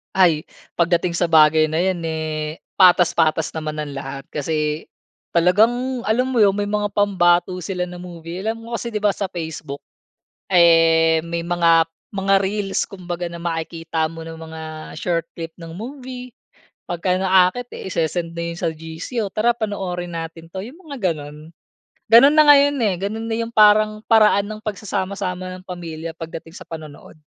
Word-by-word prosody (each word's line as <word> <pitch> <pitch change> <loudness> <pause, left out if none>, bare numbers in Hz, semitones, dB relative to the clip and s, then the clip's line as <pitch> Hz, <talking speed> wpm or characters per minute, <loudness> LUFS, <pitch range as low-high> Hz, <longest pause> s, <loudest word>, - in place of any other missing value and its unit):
Ay, 170 -5 +4 0.3
pagdating 170 0 +1
sa 175 - +1
bagay 155 0 +5
na 160 - 0
yan, 180 -1 0
eh, 155 -1 -3 0.2
patas-patas 170 -4 +4
naman 155 -1 -4
ang 145 -2 -5
lahat 135 0 -6
kasi 150 +1 -2 0.5
talagang, 235 +9 +2
alam 240 +4 +1
mo 245 -4 +3
'yon, 200 - +5
may 205 +1 -2
mga 205 0 -1
pambato 185 -3 +2
sila 180 -1 -3
na 180 - -9
movie. 175 0 -8
Alam 225 +1 -2
mo 235 - -3
kasi 235 0 -4
'di 215 - -2
ba 205 -1 +1
sa 195 -2 -3
Facebook, 160 -4 -6 0.7
eh, 165 -2 +5
may 170 0 -4
mga 170 -1 +4 0.3
mga 195 0 +1
reels 195 0 -1
kumbaga 175 -2 -5
na 170 - -8
makikita 165 -1 -2
mo 165 0 -9
ng 165 0 -8
mga 160 0 -8 0.4
short 170 0 -1
clip 165 -1 -6
ng 165 0 -9
movie. 250 +1 -8 0.5
Pagka 180 +1 -1
naakit 190 +5 +3
isesend 170 -1 -3
na 170 - -2
'yon - - -10
sa 170 - 0
GC, 160 +8 -7
"O, 195 - -10
tara 220 +3 +3
panoorin 180 -5 -3
natin 165 0 -6
'to," 190 +3 -7
yung 255 +10 -10
mga 255 - -1
gano'n. 150 0 -8 0.6
Gano'n 240 +7 +7
na 310 - +7
ngayon, 285 0 +6
eh. 210 -6 +1
Ganun 220 +3 -3
na 225 - -1
yung 230 0 -3
parang 215 -1 +5
paraan 215 -3 +5
ng 215 0 -8
pagsasama-sama 190 -3 -3
ng 185 - -20
pamilya 165 -3 -6
pagdating 165 0 -8
sa - - -9
panonood. 155 -1 -10
175 Hz, 165 wpm, -21 LUFS, 165-205 Hz, 0.7 s, Gano'n